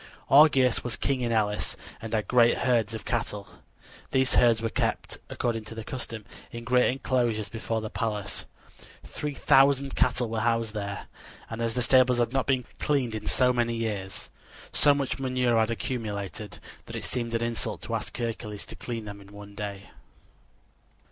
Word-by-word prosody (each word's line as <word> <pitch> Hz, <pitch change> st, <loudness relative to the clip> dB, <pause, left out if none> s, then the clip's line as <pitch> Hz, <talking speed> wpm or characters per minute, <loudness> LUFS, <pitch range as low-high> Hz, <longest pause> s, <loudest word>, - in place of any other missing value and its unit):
Augeas 135 Hz, -4 st, +6 dB
was 120 Hz, -2 st, -2 dB
king 135 Hz, -2 st, 0 dB
in 120 Hz, -1 st, 0 dB
Elis 105 Hz, -2 st, 0 dB, 0.2 s
and 110 Hz, -, -6 dB
had 110 Hz, -4 st, 0 dB
great 120 Hz, -1 st, +5 dB
herds 115 Hz, -3 st, +1 dB
of 110 Hz, -, -7 dB
cattle. 105 Hz, -4 st, -2 dB, 0.6 s
These 130 Hz, 0 st, +2 dB
herds 115 Hz, -2 st, +5 dB
were 115 Hz, 0 st, -2 dB
kept, -, -, -1 dB
according 115 Hz, -2 st, -2 dB
to 115 Hz, -, -8 dB
the 110 Hz, -, -5 dB
custom, 115 Hz, -2 st, -5 dB, 0.3 s
in 115 Hz, 0 st, -7 dB
a -, -, -13 dB
great 125 Hz, +1 st, +4 dB
inclosure 120 Hz, -4 st, 0 dB
before 115 Hz, 0 st, -2 dB
the 110 Hz, -, -5 dB
palace. 105 Hz, -3 st, -3 dB, 0.6 s
Three 150 Hz, -1 st, -5 dB
thousand 135 Hz, 0 st, +4 dB
cattle 120 Hz, -1 st, +2 dB
were 110 Hz, 0 st, -2 dB
housed 115 Hz, -1 st, +1 dB
there, 100 Hz, -2 st, -4 dB, 0.5 s
and 115 Hz, +1 st, -4 dB
as 115 Hz, -1 st, -1 dB
the 125 Hz, -, +1 dB
stables 125 Hz, 0 st, +5 dB
had 120 Hz, 0 st, +1 dB
not 135 Hz, -1 st, +1 dB
been 130 Hz, -3 st, +1 dB
cleaned 125 Hz, -7 st, 0 dB
for 125 Hz, -1 st, +4 dB
many 120 Hz, -1 st, +1 dB
years, 105 Hz, -4 st, -3 dB, 0.4 s
so 145 Hz, -1 st, +5 dB
much 140 Hz, -1 st, -2 dB
manure 125 Hz, -2 st, +1 dB
had 110 Hz, 0 st, +2 dB
accumulated 105 Hz, -4 st, -4 dB, 0.3 s
that -, -, -7 dB
it -, -, -3 dB
seemed 115 Hz, -2 st, -1 dB
an 115 Hz, -, 0 dB
insult 115 Hz, -1 st, -3 dB
to -, -, -5 dB
ask -, -, -3 dB
Hercules 110 Hz, -3 st, -4 dB
to -, -, -9 dB
clean 115 Hz, -3 st, -5 dB
them 100 Hz, -1 st, -8 dB
in 100 Hz, 0 st, -15 dB
one 100 Hz, 0 st, -11 dB
day. 100 Hz, -1 st, -6 dB
115 Hz, 175 wpm, -27 LUFS, 110-125 Hz, 0.6 s, Augeas